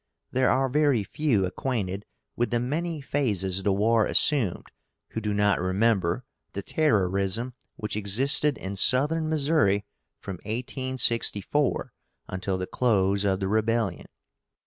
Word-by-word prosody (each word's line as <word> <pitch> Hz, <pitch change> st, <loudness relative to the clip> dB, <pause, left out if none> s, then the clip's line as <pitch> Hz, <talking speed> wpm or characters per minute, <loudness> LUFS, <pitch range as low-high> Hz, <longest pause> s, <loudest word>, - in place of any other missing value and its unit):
There 130 Hz, 0 st, +2 dB
are 135 Hz, 0 st, +2 dB
very 140 Hz, -4 st, +2 dB
few 110 Hz, -2 st, 0 dB
acquainted 100 Hz, -1 st, -3 dB, 0.3 s
with 120 Hz, -, 0 dB
the 120 Hz, -, 0 dB
many 155 Hz, +5 st, -2 dB
phases 100 Hz, -10 st, -1 dB
the 100 Hz, -, +1 dB
war 110 Hz, +3 st, +2 dB
assumed 125 Hz, -, +1 dB, 0.4 s
who 110 Hz, -, -5 dB
do 105 Hz, -1 st, -2 dB
not 105 Hz, -3 st, +2 dB
remember 95 Hz, +1 st, +1 dB, 0.3 s
the 100 Hz, -, -5 dB
terrorism 105 Hz, -, 0 dB, 0.2 s
which 105 Hz, -1 st, -5 dB
existed 135 Hz, +8 st, +3 dB
in 95 Hz, +1 st, -6 dB
Southern 150 Hz, -, +3 dB
Missouri 145 Hz, -10 st, +2 dB, 0.3 s
from 95 Hz, -2 st, -7 dB
1864 125 Hz, -, -1 dB, 0.3 s
until 95 Hz, 0 st, -3 dB
the 90 Hz, -, -3 dB
close 100 Hz, -4 st, +1 dB
of 95 Hz, 0 st, 0 dB
the 95 Hz, -, 0 dB
rebellion. 110 Hz, -2 st, 0 dB
110 Hz, 125 wpm, -26 LUFS, 95-130 Hz, 0.4 s, existed